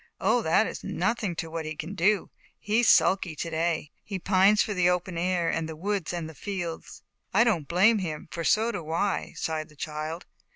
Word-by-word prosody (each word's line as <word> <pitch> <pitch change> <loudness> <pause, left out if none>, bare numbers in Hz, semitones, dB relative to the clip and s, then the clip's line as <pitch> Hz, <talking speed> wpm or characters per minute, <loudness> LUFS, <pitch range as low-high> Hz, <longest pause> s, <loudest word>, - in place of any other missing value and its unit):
"Oh, - - +2
that - - +3
is - - -6
nothing 215 -6 -1
to 165 -1 -5
what 165 0 -3
he 155 0 -5
can 160 +6 -6
do; 200 +2 +1 0.3
he's 220 +2 +2
sulky 180 -4 +4
to 165 +3 -4
day. 160 -1 -1
He 195 - -4
pines 195 +3 +4
for 210 - -3
the 180 -2 +3
open 180 0 -1
air 175 0 0
and 160 -1 -2
the 160 - -6
woods 195 +1 -2
and 160 -3 -5
fields." 175 -4 -6 0.3
"I 225 - +7
don't 180 -12 +1
blame 200 +6 +4
him, 155 -5 -5
for 165 - -4
so 220 +7 +3
do 160 -8 -6
I," 190 +4 -1
sighed 155 -1 -3
the 150 - -18
child. 155 +3 -5
175 Hz, 200 wpm, -27 LUFS, 160-200 Hz, 0.3 s, I